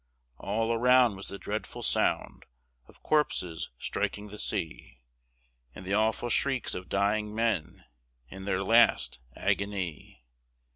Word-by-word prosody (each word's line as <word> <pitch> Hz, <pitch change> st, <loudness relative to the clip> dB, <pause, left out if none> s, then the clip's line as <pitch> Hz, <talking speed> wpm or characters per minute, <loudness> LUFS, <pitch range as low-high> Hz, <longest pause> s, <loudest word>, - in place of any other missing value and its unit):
All 115 Hz, +3 st, 0 dB
around 125 Hz, -1 st, +5 dB
was 95 Hz, -, -8 dB
the 100 Hz, -, -6 dB
dreadful 105 Hz, +2 st, -5 dB
sound -, -, 0 dB, 0.4 s
Of -, -, -21 dB
corpses 90 Hz, -, 0 dB
striking 105 Hz, +9 st, -3 dB
the 105 Hz, +1 st, -9 dB
sea, 75 Hz, -6 st, -4 dB, 0.7 s
And 90 Hz, -, -9 dB
the 95 Hz, -, -2 dB
awful 110 Hz, +3 st, +1 dB
shrieks 135 Hz, 0 st, +1 dB
of 90 Hz, 0 st, -6 dB
dying 105 Hz, +2 st, 0 dB
men 115 Hz, -8 st, -1 dB, 0.4 s
In 95 Hz, +5 st, -9 dB
their 95 Hz, -1 st, 0 dB
last 115 Hz, -, +4 dB, 0.2 s
agony. 90 Hz, -11 st, -3 dB
105 Hz, 125 wpm, -29 LUFS, 95-115 Hz, 0.7 s, around